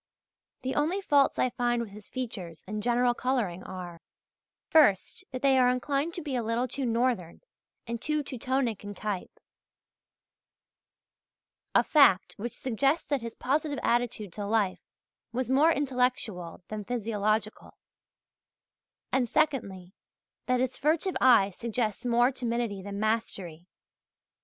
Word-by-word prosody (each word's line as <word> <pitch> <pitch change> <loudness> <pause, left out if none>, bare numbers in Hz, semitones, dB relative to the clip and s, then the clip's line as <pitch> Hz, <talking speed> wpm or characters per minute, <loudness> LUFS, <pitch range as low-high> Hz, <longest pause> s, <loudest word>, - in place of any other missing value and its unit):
The 260 +1 -1
only 320 +7 +1
faults 285 -8 +3
I 255 - +2
find 240 0 0
with 230 -3 -4
his 210 0 -12
features 195 -10 -6
and 210 +2 -4
general 245 +2 +2
colouring 235 -9 -1
are, 180 -3 -8 0.7
first, 300 - +3
that 255 0 -6
they 270 -1 +5
are 250 -1 +5
inclined 275 +6 -1
to 345 - -4
be 285 -4 -3
a 245 - +1
little 230 +3 0
too 265 0 -2
northern 230 -7 0 0.4
and 235 -1 -4
too 300 -1 0
Teutonic 255 -4 -2
in 205 0 -7
type 205 -2 -5 2.4
a - - +6
fact 280 - +5
which 235 +4 -5
suggests 270 +5 +1
that 285 -3 0
his 230 -1 -6
positive 290 +2 -1
attitude 235 -6 0
to 205 - -4
life 205 -3 +1 0.5
was 250 +1 -2
more 295 +5 +5
intellectual 250 - -1
than 215 -1 -4
physiological 215 -1 -2 1.3
and, 250 -3 +1
secondly, 200 - 0 0.5
that 255 -1 +2
his 255 -1 -1
furtive 320 +6 +1
eye 230 -6 +6
suggests 225 +2 -2
more 240 +2 +4
timidity 235 -5 -2
than 200 +1 -6
mastery. 195 -6 -2
240 Hz, 135 wpm, -28 LUFS, 210-265 Hz, 2.4 s, a